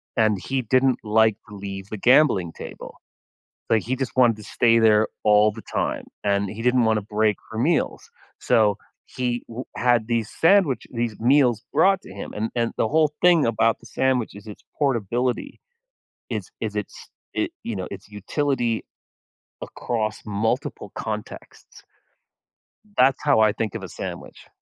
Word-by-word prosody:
And 110 -4 +2
he 135 +6 -2
didn't 130 +2 +2
like 110 0 +3
to 105 - -10
leave 100 -1 -7
the 110 - -5
gambling 120 - +4
table. - - -10 0.7
But, 115 - +4
he 125 +6 -2
just 130 -2 -4
wanted 120 -4 +5
to 105 - -12
stay 115 0 +3
there 110 -1 +5 0.2
all 105 0 +5
the 110 +1 -10
time, - - -2 0.2
and 100 -1 +1
he 110 +3 -8
didn't 125 -1 +3
wanna 110 -1 +2
break 105 0 +1
for - - -9
meals, - - 0 0.3
so, 105 -3 +3 0.3
he 125 -1 -3
w 120 +3 -6
had 120 -3 +2
these 115 -2 -1
sandwich 165 -6 +3
these 115 -3 -3
meals 125 -2 +3
brought 190 +6 +4
to - - -12
him, 100 - -7
and 110 +2 -2
and 115 -1 0
the 110 - +1
whole 155 +1 +2
thing 175 -7 +5
about 115 0 +2
the 120 - -15
sandwich 125 -2 0
is 100 +2 -12
its 105 - -10 0.2
portability. 125 -2 -1 0.7
Is - - -4
is - - -3
its - - -6 0.2
it 330 0 -1
you 115 - -4
know, 95 -2 -4
its 100 +1 -9
utility 120 +2 -1 0.8
across 110 -3 -3
multiple 105 +2 -2
contexts. - - -7 1.2
That's 135 +1 +4
how 145 -6 +4
I 110 -1 +5
think 110 -2 -3
of - - -5
a - - -7
sandwich. - - -8
115 Hz, 160 wpm, -23 LUFS, 105-130 Hz, 1.2 s, wanted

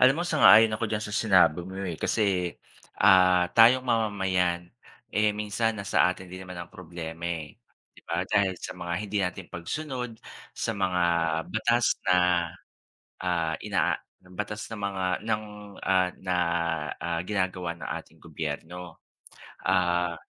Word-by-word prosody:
Alam 130 +2 +6
mo - - +1
sang-ayon 115 -9 +7
ako 110 - -2
d'yan 110 - -1
sa 105 - -5
sinabi 95 -6 +4
mo 95 +1 -8
eh, 90 -4 -3
kasi, 95 -2 0 0.5
ah, 90 -2 +6
tayong 125 +3 +7
mamamayan, 95 -6 0 0.5
eh 105 0 +3
minsan 105 +2 -1
nasa 100 -2 +2
atin 95 0 -12
din 95 +1 -8
naman 90 -1 -8
ang 85 - -9
problema 85 -3 -8
eh, 85 -3 -4 0.4
'di - - -17
ba? - - -1
Dahil 95 -2 +2
sa - - -6
mga 85 -1 -4
hindi 105 -1 -4
natin 90 0 -5
pagsunod, 125 - -4 0.4
sa - - -3
mga 95 -2 0 0.5
batas 120 +2 +2 0.2
na, - - +6 1.1
ah, 85 -3 0
inaa 95 -4 +1 0.3
batas 105 +3 -6
ng 110 - -6
mga 100 -2 -2 0.2
ng, 110 -1 0 0.4
ah, 95 -1 +2
na, 90 -1 -1 0.6
ah, 85 -1 -2
ginagawa 90 -3 -2
ng - - -6
ating - - -22
gobyerno. 80 +3 -6 0.7
Ah, 90 -1 +2
95 Hz, 140 wpm, -27 LUFS, 90-105 Hz, 1.1 s, sang-ayon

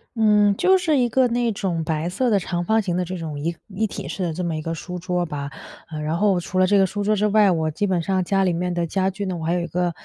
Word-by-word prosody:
嗯， 210 -2 +4
就 380 +1 +4
是 320 -5 +1
一 245 -2 +3
个 255 +2 +3
那 240 0 +1
种 180 -5 -2
白 160 +2 -1
色 245 +7 0
的 210 - +3
长 175 -1 -2
方 220 +2 +3
形 180 -3 -2
的 180 - 0
这 185 +1 -5
种 155 -3 -5
一 165 +3 -2
一 215 +2 -1
体 - - -7
式 195 - -5
的 165 -2 -1
这 180 +2 -4
么 170 -2 -1
一 155 - -4
个 165 +1 -3
书 180 +2 -6
桌 180 0 -1
吧。 145 -3 -5 0.4
呃， 155 -1 -5
然 155 +2 -1
后 200 -2 +3
除 185 +2 -2
了 185 - +4
这 200 +1 +4
个 195 - +5
书 205 +2 -4
桌 210 +1 +2
之 210 +1 +1
外， 210 -1 +4
我 160 -3 0
基 205 +7 -1
本 180 -3 +1
上 190 0 0
家 195 +2 +1
里 180 - +2
面 180 +1 -1
的 175 -1 0
家 190 +3 0
具 195 +2 -5
呢 185 -2 -3
我 160 - -5
还 170 - +1
有 175 - 0
一 170 - -3
个 175 +1 -1
180 Hz, 330 characters per minute, -22 LUFS, 170-205 Hz, 0.4 s, 个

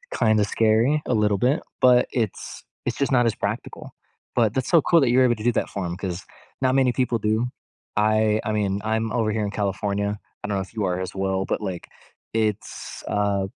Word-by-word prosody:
kinda 110 -2 +3
scary 115 +8 +2
a - - +1
little 105 -2 +2
bit, 130 +7 +2 0.2
but 125 -1 +5
it's 110 -5 -3 0.2
it's - - -2
just 140 0 0
not 125 -2 +4
as 115 - +2
practical. - - -5 0.4
But 115 -4 +3
that's 130 -1 -2
so 170 -3 +6
cool 170 +1 +4
that 130 - +3
you're 130 +2 +5
able 120 -2 +3
to 105 - -8
do 120 - +3
that - - -1
for 100 -3 -4
'em 85 - -3
'cause 95 -2 -4 0.4
not 130 0 +2
many 130 -2 +4
people 125 -2 +1
do. 110 +3 +1 0.5
I 110 0 +3
I 110 - -2
mean, 100 -2 0
I'm 110 0 -1
over 110 -3 +1
here 110 0 -1
in 100 - -2
California- 100 0 -2 0.2
I - - -3
don't 100 - -1
know 95 - 0
if 95 - -9
you 105 -3 -1
are 90 0 -1
as 95 - -4
well, 95 0 -1
but, - - -2
like, 95 -4 -5 0.5
it's, 110 -2 -3
uh 100 -1 0
110 Hz, 215 wpm, -24 LUFS, 100-120 Hz, 0.5 s, so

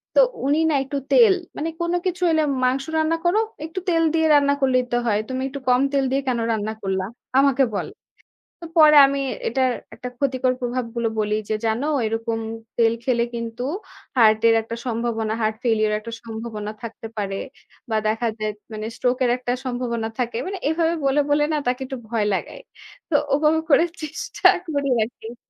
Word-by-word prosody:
তো - - +6 0.3
উনি 290 +3 +2
না - - +1
একটু 280 +1 -4
তেল। 455 -6 +7 0.2
মানে 320 +2 -2
কোন 340 0 0
কিছু 360 0 -2
হইলে 315 -1 +3 0.2
মাংস 260 +2 +2
রান্না 315 +1 +2
করো, 380 +5 +3 0.3
একটু 330 +4 -5
তেল 330 -1 +3
দিয়ে 320 -1 +3
রান্না 285 -1 +4
করলেই 255 -1 +3
তো 240 - +2
হয়, 210 -1 +2
"তুমি 260 0 -2
একটু 280 +1 -6
কম 250 +1 +4
তেল 275 -1 +2
দিয়ে 275 +1 +1
কেনো 235 -2 0
রান্না 220 0 -1
করলা?" 190 -1 -1 0.4
আমাকে 275 -1 +4
বলে, - - -3 0.7
তো - - -7
পরে 305 -1 +8
আমি 275 0 -1 0.3
এটার 260 +1 +1 0.2
একটা 250 - -6
ক্ষতিকর 260 -2 +1
প্রভাবগুলো 240 -1 -2
বলি 210 0 0 0.2
যে, 215 - +1
"জানো 225 +6 0 0.2
এরকম 225 +1 -2 0.4
তেল 230 -1 +4
খেলে 235 -1 +2
কিন্তু 230 +1 -5 0.5
হার্টের 220 0 +5
একটা 230 +1 -6
সম্ভাবনা, 225 -2 -1
হার্ট 215 0 +1
ফেইলিউর 215 -2 +2
এর - - +1
একটা 230 +2 -8
সম্ভাবনা 220 -2 -6
থাকতে 225 0 -7
পারে। 195 -2 -2 0.5
বা 220 - 0
দেখা 225 +2 0
যায় 215 0 -1 0.2
মানে 215 0 -5
স্ট্রোক 250 0 0
এর 240 - +3
একটা 245 -1 -3
সম্ভাবনা 240 -3 -2
থাকে।" 240 -1 -1
মানে 390 0 -4
এভাবে 330 +1 +1
বলে, 275 +2 +3
বলে 295 0 +3
না 305 - +1
তাকে 250 +2 0
একটু 265 0 -6
ভয় 225 -3 0
লাগাই। - - -4 0.5
তো 305 - 0 0.2
ওভাবে 305 +2 +3
করে 285 +4 +6 0.2
চেষ্টা 370 +6 0 0.2
করি 280 -1 0
আরকি। 230 +1 -8
250 Hz, 180 wpm, -22 LUFS, 225-285 Hz, 0.7 s, পরে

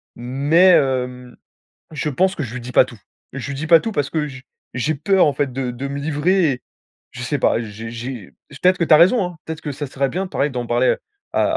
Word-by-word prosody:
Mais, 145 +9 +3
hem, 125 -4 0 0.6
je 150 0 -2
pense 185 +7 +1
que 155 - -3
je 120 -3 -7
lui 125 - -5
dis 125 +1 -8
pas - - +7
tout. 120 -5 -13 0.3
Je 135 0 -5
lui - - -3
dis 155 +4 -4
pas 165 0 +7
tout 225 - -3
parce 145 -6 -1
que 155 -2 -1
je 135 -2 -10 0.3
j'ai 150 +6 -1
peur 190 +6 +3
en 145 - +1
fait 140 -2 -2
de 130 -1 -2
de 130 +3 -5
me 140 +1 -4
livrer 160 +3 +1
et 125 - -9 0.5
je 125 - -9
sais 145 +3 -1
pas, 115 - +2
j'ai 115 +1 -7
j'ai 120 -3 -7 0.3
peut-être 185 +1 +4
que - - +2
tu 155 - +5
as - - +9
raison, 190 +7 +5
hein, 175 -2 -7
peut-être 160 0 -6
que 150 - -4
ça 145 +1 -5
serait 135 +1 -1
bien 190 +7 -3
pareil, 150 -5 -1
d'en 125 -2 -4
parler 120 +2 +2 0.4
à - - +2
140 Hz, 245 wpm, -20 LUFS, 125-160 Hz, 0.6 s, as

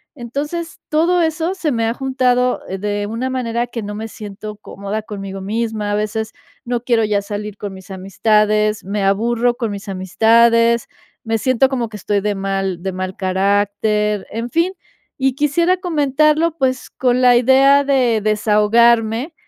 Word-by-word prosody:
Entonces, 295 +7 -5
todo 335 +3 +2
eso 325 +2 0
se 325 -5 -1
me 230 -1 0
ha 225 - 0
juntado 250 -1 +1 0.2
de 205 0 -2
una 230 +4 -3
manera 240 -2 -2
que 230 -2 -6
no 205 0 -5
me 220 +1 -5
siento 210 0 -8
cómoda 205 +1 -5
conmigo 195 -2 -7
misma, 215 +1 -2
a 205 - +1
veces 215 +1 -2 0.3
no 240 -1 -2
quiero 235 -3 +2
ya 210 -1 +1
salir 205 0 -6
con 205 -2 -6
mis 190 0 -12
amistades, 210 +2 +1
me 200 +1 -2
aburro 235 +5 +1
con 235 -3 -3
mis 200 0 -7
amistades, 230 +5 +3 0.4
me 225 0 0
siento 255 +3 +2
como 245 -4 -2
que 215 - -8
estoy 205 +1 -1
de 205 0 -1
mal 195 -2 -2
de 190 -1 -3
mal 185 0 -5
carácter, 205 +2 0
en 230 +2 -4
fin. 335 +6 +1 0.5
Y 265 0 +2
quisiera 335 +6 +2
comentarlo, 305 -1 +1
pues, 260 -2 -1
con 250 -1 +1
la 245 -1 +6
idea 270 +3 +5
de 255 -5 +2
desahogarme 220 - +2
225 Hz, 160 wpm, -18 LUFS, 205-255 Hz, 0.5 s, la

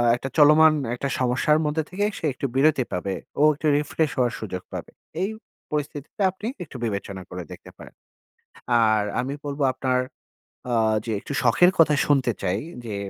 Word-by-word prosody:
একটা 135 +2 -5
চলমান 155 +1 +7 0.2
একটা 140 +3 -3
সমস্যার 130 +5 +2
মধ্যে 150 +2 0
থেকে 200 +3 -1
সে - - -4
একটু 135 - -5
বিরতি 140 -1 +3
পাবে। 95 +2 -2 0.3
ও - - +6
একটু 150 +2 -3
রিফ্রেশ 150 +1 -1
হওয়ার 125 -1 +2
সুযোগ 90 -4 -5
পাবে। - - -6 0.3
এই 190 - 0 0.4
পরিস্থিতিতে 150 +3 -4
আপনি 190 +4 -7 0.2
একটু 140 - -10
বিবেচনা 100 -3 -4
করে 90 0 -5
দেখতে - - -11
পারেন। - - -13 0.9
আর 110 -1 +3 0.2
আমি 130 +2 -4
বলব 140 0 -4
আপনার 130 -1 0 0.7
আ - - +2 0.3
যে 115 - -3
একটু - - -7
শখের 135 +9 +5
কথা 155 -2 +5
শুনতে 135 -4 +2
চাই। 95 0 0 0.3
যে 105 -3 -4
135 Hz, 165 wpm, -24 LUFS, 115-150 Hz, 0.9 s, চলমান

